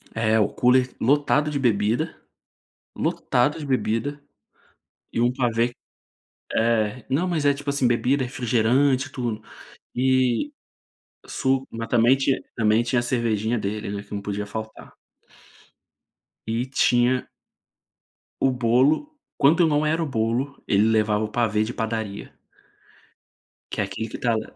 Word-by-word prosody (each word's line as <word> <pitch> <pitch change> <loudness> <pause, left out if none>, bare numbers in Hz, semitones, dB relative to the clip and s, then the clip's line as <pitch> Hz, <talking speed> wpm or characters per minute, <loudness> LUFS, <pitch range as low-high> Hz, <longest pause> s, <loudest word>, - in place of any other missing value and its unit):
É, 110 0 +2
o 105 - +2
cooler 125 +1 +3
lotado 145 +3 +2
de 140 - -1
bebida, 115 +5 +1 0.8
lotado 145 +6 0
de 150 - -6
bebida, 135 +2 -1 0.9
e 115 - 0
um 120 +1 +3
pavê 120 -1 0 0.8
é, 115 +1 +1
não 160 +8 0
mas 155 -5 0
é, 140 - +4
tipo 145 0 -4
assim, 140 -3 +1
bebida, 130 +3 +1
refrigerante, 125 +3 +1
tudo, 115 -4 -4 0.5
e 130 - +2 0.7
su 135 -1 -1
mas 115 0 -5
também 120 +3 +4
tinha 135 0 0
também 110 +1 +3
tinha 120 +1 +1
a - - 0
cervejinha 115 -2 0
dele, 105 +1 -4
né, 100 0 -5
que 100 - -12
não 100 - -3
podia 105 0 -4
faltar. 110 +1 -8 1.5
E 115 +3 -1
tinha 125 -1 +2 1.1
o 135 - +3
bolo, 130 - +2 0.3
quando 155 +5 +4
eu - - +4
não 150 0 +1
era 160 +2 +1
o - - 0
bolo, 125 +2 -2
ele 105 +2 +3
levava 110 -1 +2
o - - -3
pavê 110 -2 0
de 115 - -4
padaria. 110 -3 -4 1.4
Que - - -2
é - - +2
aquilo 100 +3 -5
que - - -8
está 115 -2 +1
lá 110 - -5
120 Hz, 140 wpm, -24 LUFS, 110-135 Hz, 1.5 s, é